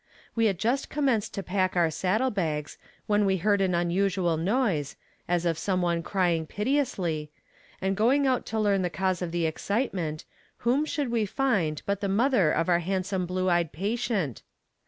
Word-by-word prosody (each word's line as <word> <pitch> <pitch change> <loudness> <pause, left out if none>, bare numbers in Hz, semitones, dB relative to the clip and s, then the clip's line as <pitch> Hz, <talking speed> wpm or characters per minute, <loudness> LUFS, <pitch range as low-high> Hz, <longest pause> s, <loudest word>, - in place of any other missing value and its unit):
We 230 -1 +3
had 195 -4 0
just 240 +8 0
commenced 265 -8 0
to 195 - -3
pack 185 0 0
our 170 -2 +3
saddle 215 - +1
bags, 155 -6 -3 0.3
when 210 0 +2
we 190 -1 +2
heard 200 +2 +2
an 185 -2 +2
unusual 175 0 +1
noise, 175 - 0 0.3
as 175 0 0
of 165 -2 0
some 185 -1 0
one 170 -1 +1
crying 170 -3 0
piteously, 195 - -1 0.5
and 195 +1 0
going 255 +8 +3
out 255 -2 +2
to 220 - -2
learn 200 -2 +2
the 180 - 0
cause 185 +2 -1
of 175 -2 -3
the 170 -1 0
excitement, 170 - -2 0.4
whom 265 +6 +3
should 290 -5 -2
we 225 -3 +1
find 195 - 0
but 200 0 -1
the 200 - -1
mother 205 - +3
of 165 - 0
our 175 -1 +3
handsome 185 +1 -2
blue 185 +1 -1
eyed 175 -3 +2
patient. 200 - -2
190 Hz, 175 wpm, -27 LUFS, 170-215 Hz, 0.5 s, We